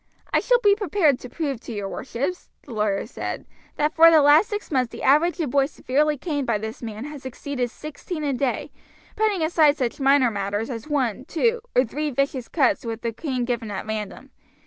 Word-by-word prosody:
"I - - +5
shall - - +3
be 410 -1 +6
prepared 370 - +2
to 250 - -9
prove 280 -4 -3
to - - -8
your 205 -3 -4
worships," 270 - -4
the 255 - -10
lawyer 210 -2 0
said, 225 - -5 0.3
"that 300 +1 0
for 330 +1 +8
the 315 -3 +6
last 300 +8 +6
six 415 -4 -5
months 255 -4 +1
the - - -8
average 310 +7 +3
of 300 -7 -1
boys 275 +1 +2
severely 295 +2 0
caned 290 -2 -3
by 230 -3 +2
this 220 +2 -6
man 220 -1 -6
has 295 -2 -8
exceeded 260 -1 -4
sixteen 305 +4 -7
a 285 -2 0
day, 255 0 -2 0.4
putting 425 -6 +1
aside 315 -2 +4
such 250 -2 -2
minor 270 -3 +4
matters 205 +3 -2
as 230 +2 -6
one, 260 -5 -1
two, 460 +10 0
or 250 - +5
three 300 +6 -3
vicious 275 -2 -1
cuts 275 -7 +1
with 225 -1 -5
the 230 -1 -2
cane 255 -1 -2
given 235 -3 -2
at 200 -2 -5
random. 215 +5 -5
275 Hz, 205 wpm, -24 LUFS, 235-305 Hz, 0.4 s, for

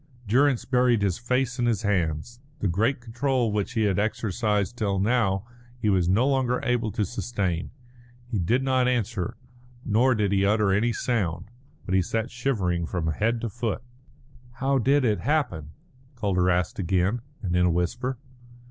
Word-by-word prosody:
Durrance 130 +3 +3
buried 125 -4 +2
his 95 -3 0
face 125 +1 -1
in 120 - +2
his 110 -4 0
hands. 95 +3 -1 0.2
The 105 - -1
great 110 +9 +1
control 120 0 0
which 105 +3 -2
he 110 -3 +1
had 100 -3 +1
exercised 105 0 0
till 100 -4 -1
now 100 -1 +1 0.3
he 110 -4 +1
was 90 -3 +2
no 115 +8 +3
longer 130 -3 +1
able 120 -3 0
to 105 -2 0
sustain. 95 -6 -2 0.6
He 120 -4 -3
did 120 +10 +1
not 130 -1 +2
answer, 115 -3 -1 0.5
nor 120 +4 +3
did 105 -2 0
he 100 -1 +2
utter 105 0 +3
any 110 +5 +2
sound, 100 -5 -2 0.3
but 95 - -3
he 95 - +4
sat 115 +7 -2
shivering 100 -10 -1
from 85 -3 -2
head 115 +8 0
to 115 - -2
foot. 120 +1 -3 0.7
"How 135 +2 +1
did 135 +3 +3
it 105 -3 +2
happen?" 125 - -1 0.5
Calder 95 -6 +1
asked 90 +2 0
again, 95 +5 +1 0.2
and 90 -3 -1
in 90 0 +4
a - - +3
whisper. 90 +10 -1
110 Hz, 165 wpm, -26 LUFS, 95-125 Hz, 0.7 s, he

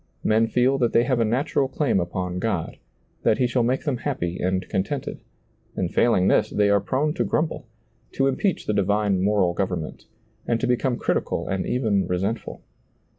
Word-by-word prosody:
Men 110 +1 +3
feel 125 +4 +2
that 120 -2 +1
they 115 - +5
have 125 0 0
a - - +4
natural 130 +4 0
claim 130 -6 0
upon 90 +1 -3
God, 100 -5 -2 0.4
that - - +2
He 130 - +2
shall 125 0 +1
make 125 +3 0
them 140 -5 -1
happy 105 -10 -3
and 95 +1 -1
contented, 125 +9 -3 0.6
and 90 0 -2
failing 105 -6 +3
this, - - +3
they 105 -1 +2
are 100 - +4
prone 140 +8 0
to 175 - 0
grumble, 155 -4 -2 0.5
to 135 - +1
impeach 155 +8 0
the 105 - 0
divine 100 -1 +1
moral 100 -3 +2
government, 90 -4 -3 0.4
and 115 -1 +1
to - - 0
become 125 0 +1
critical - - -1
and 95 -1 -2
even 110 -6 +1
resentful. 100 +6 -3
110 Hz, 175 wpm, -24 LUFS, 95-130 Hz, 0.6 s, they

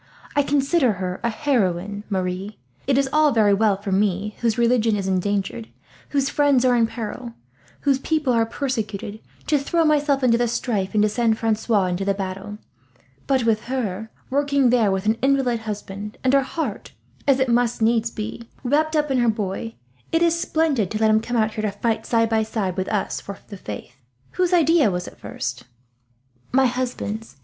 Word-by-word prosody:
I 285 - +5
consider 280 -2 +2
her 185 -1 -4
a 235 - +2
heroine, 205 - -1
Marie. 190 +1 -3 0.3
It 270 -1 +3
is 275 -1 +2
all 305 -1 +5
very 215 -4 +4
well 200 -1 +2
for 200 -1 -5
me, 200 +1 0
whose 230 -1 0
religion 235 -2 +3
is 195 -2 -2
endangered, 200 +4 -1 0.4
whose 275 -2 +1
friends 280 -3 +3
are 250 -1 +4
in 230 -1 +3
peril, 235 +1 -6 0.5
whose 275 -2 +2
people 300 -3 0
are 230 -1 +2
persecuted, 220 -6 -3 0.3
to 300 -2 +2
throw 325 +4 +1
myself 290 -3 +2
into 235 -2 +4
the 240 - +2
strife 215 -4 -2
and 210 - +4
to - - +4
send 225 0 +1
Francois 220 -2 +1
into 180 +1 -1
the 195 0 +1
battle; 195 +1 -5 0.7
but 265 -3 +2
with 225 -2 +1
her, 220 -5 -3 0.2
working 280 -2 +2
there 235 -5 +3
with 190 +1 -1
an 220 +1 +1
invalid 265 -3 +2
husband, 210 -1 -6
and 260 0 +2
her 275 - +5
heart, 270 -5 -4 0.3
as 275 -1 +4
it 260 - +2
must 235 -1 +2 0.3
be, 225 +2 -6
wrapped 310 +5 +1
up 300 -2 +1
in 260 - +2
her 240 -1 +3
boy, 215 +1 -3 0.4
it 330 +1 +3
is 335 -1 +4
splendid 315 - 0
to 215 - -2
let 220 0 +3
him 215 0 +4
come 245 +1 -2
out 215 -1 +1
here, 215 - -3
to 215 - 0
fight 225 -1 -1
side 230 -1 +3
by 220 0 +1
side 215 -4 -2
with 185 -1 -2
us 210 -2 -1
for 200 0 -8
the 205 - -7
faith. 125 - -8 0.3
Whose 365 -1 0
idea 330 - +4
was 180 -1 -3
it - - -12
first?" - - -5 0.9
"My 265 +1 +4
husband's. 240 - -3
225 Hz, 190 wpm, -22 LUFS, 205-270 Hz, 0.9 s, I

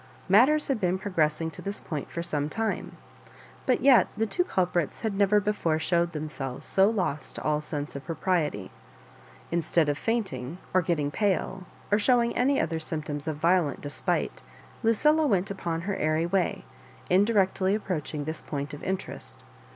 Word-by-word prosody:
Matters 265 +10 +5
had 265 -6 -1
be6n 185 0 +1
progressing 160 -4 0
to - - -10
this 200 +1 -4
point 150 -4 -5
for 170 - -4
some 150 -3 -1
time; 220 +2 -3 0.7
but - - +3
yet 260 -2 +6
the 220 - +2
two 360 +11 0
culprits 180 - -1
had 220 -3 -1
never 200 +1 +4
before 205 -6 0
showed 170 +1 +1
themselves 150 -4 -5
so 195 +1 +4
lost 185 -9 -2
to - - -6
all 150 0 +1
sense 150 -2 -5
of 140 - -6
propriety. 160 - -1 0.8
Instead 165 -2 +2
of 145 - -1
fainting 180 - -2 0.2
or 185 - +5
getting 155 -4 0
pale, 190 0 -1 0.3
or 205 - +4
showing 235 +1 +3
any 275 +3 +2
other 160 0 -1
symptoms 155 -2 -4
of 155 - -1
violent 165 -3 +2
despite, 145 0 -2 0.4
Lucilla 300 +8 +3
went 195 -4 +1
upon 170 -4 -3
her 195 +3 -2
airy 155 0 +1
way, 185 +1 0 0.5
indi 200 +5 +4
rectly 190 -1 +2
approaching 155 -7 -3
this 155 +2 -4
point 145 -1 -5
of 145 - -7
interest. 185 - -5
175 Hz, 165 wpm, -27 LUFS, 155-205 Hz, 0.8 s, yet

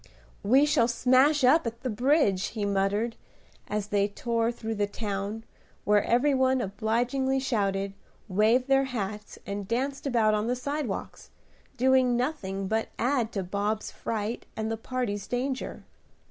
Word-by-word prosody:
"We 260 +8 +5
shall 240 -6 +3
smash 260 +5 +3
up 265 +2 +5
at 230 +1 -6
the 255 - -2
bridge," 215 - +2
he 210 -2 -3
muttered, 200 +3 0 0.5
as 210 -1 -3
they 200 -1 +2
tore 230 +2 -1
through 225 -1 -5
the 205 -1 0
town, 205 +1 -4 0.4
where 205 0 +3
every 265 +5 +3
one 260 0 +3
obligingly 245 +6 0
shouted, 200 -6 -1 0.3
waved 220 +6 +3
their 270 0 +4
hats, 210 -4 -5
and 200 -1 -4
danced 270 +5 -2
about 225 -5 +3
on 210 +1 0
the 245 - +1
sidewalks, 280 -3 -4 0.5
doing 255 -1 +4
nothing 200 -8 -2
but 220 +2 -1
add 245 -2 +1
to 195 - -2
Bob's 205 +4 -2
fright 220 +1 -4
and 220 0 -2
the - - 0
party's 225 -3 -3
danger. 255 +1 -3
230 Hz, 145 wpm, -27 LUFS, 205-260 Hz, 0.5 s, We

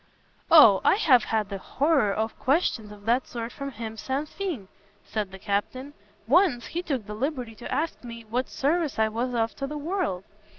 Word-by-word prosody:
"O, 230 -12 +8
I - - +5
have 265 - +4
had 215 -2 -1
the 200 -1 -5
horreur 275 -3 +1
of 220 +2 -3
questions 255 -7 +1
of 205 -1 -13
that 240 +3 +2
sort 235 -1 -5
from 275 -1 -6
him 225 -3 -7
sans 275 +6 -3
fin," 340 - -4 0.4
said 210 -3 -3
the 190 - -9
Captain; 215 +8 -3 0.3
"once 285 - +3
he 345 - -3
took 270 - -3
the 210 - -7
liberty 250 0 -3
to 235 - -8
ask 320 -2 -2
me, 230 -1 -9
what 245 +4 -2
service 305 +1 0
I 220 0 +2
was 240 +3 -2
of 225 -1 0
to 275 - -3
the 300 +2 -5
world! 310 - -2
245 Hz, 195 wpm, -26 LUFS, 220-295 Hz, 0.4 s, O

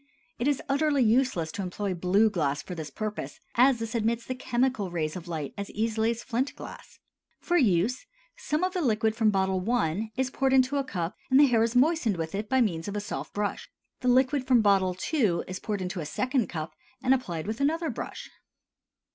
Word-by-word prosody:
It 240 - 0
is 290 -2 +1
utterly 280 -1 +2
useless 225 -8 +2
to 200 - -4
employ 190 +1 -3
blue 190 +5 +3
glass 145 -5 -1
for 180 - -7
this 160 -3 -6
purpose, 210 +8 -5
as 255 +1 +5
this 225 -1 -5
admits 230 0 0
the 255 - -3
chemical 250 -5 0
rays 155 -3 -2
of 180 -1 -7
light 155 -4 -4
as 200 - -4
easily 220 +1 0
as 235 0 -3
flint 255 +3 -2
glass. - - -11 0.4
For 350 - -1
use, 245 - +2 0.3
some 300 +3 -2
of 370 0 0
the 365 - -1
liquid 220 -5 +1
from 225 -2 +3
bottle 190 -2 +1
I. 215 -2 0
is 260 0 0
poured 270 0 +1
into 260 +2 +3
a 280 - +1
cup 175 -9 -4
and 260 +1 +5
the 290 - +8
hair 240 -4 +3
is 230 +1 +1
moistened 255 - +3
with 160 -1 -4
it 205 +2 -3
by 260 -1 +3
means 170 -7 0
of 205 - -4
a - - 0
soft 210 +2 -6
brush. 205 0 -2 0.3
The 250 - -3
liquid 255 +2 +3
from 250 -3 +5
bottle 190 -3 +3 0.2
II. 215 - +2
is 185 0 -5
poured 205 -3 -3
into 180 0 -4
a 155 - -4
second 255 - 0
cup 160 -1 -5 0.3
and 260 - +4
applied 185 -12 -2
with 220 +5 -4
another 320 +3 +1
brush. - - -6
220 Hz, 210 wpm, -27 LUFS, 185-260 Hz, 0.4 s, the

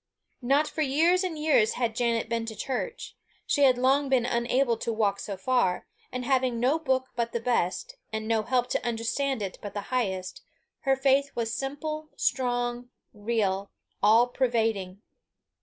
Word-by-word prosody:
Not 275 +5 +2
for 315 - -4
years 325 +6 +3
and 350 -4 -3
years 300 -8 +3
had 235 -3 -1
Janet 230 -2 0
been 230 0 -2
to 220 - -5
church; 270 - -4 0.3
she 285 -2 +3
had 255 -2 +5
long 270 +3 +2
been 255 -3 +3
unable 240 +1 +1
to 230 - -3
walk 205 -3 0
so 200 -2 -5
far; 195 -4 +1 0.3
and 250 0 -4
having 255 -2 +1
no 265 +7 +2
book 260 -4 0
but 235 -1 -2
the 235 - 0
best, 245 - -1
and 220 0 -3
no 225 -1 +2
help 245 +2 0
to - - 0
understand 240 +2 -1
it 190 - -5
but 205 -1 -7
the - - -1
highest, 190 -7 -2 0.5
her 270 - +5
faith 275 +1 +3
was 225 -1 -2
simple, 305 +4 -4
strong, 245 -1 -1 0.2
real, 205 -3 -1 0.3
all 220 +4 +6
pervading. 225 -6 -1
245 Hz, 165 wpm, -27 LUFS, 225-270 Hz, 0.5 s, all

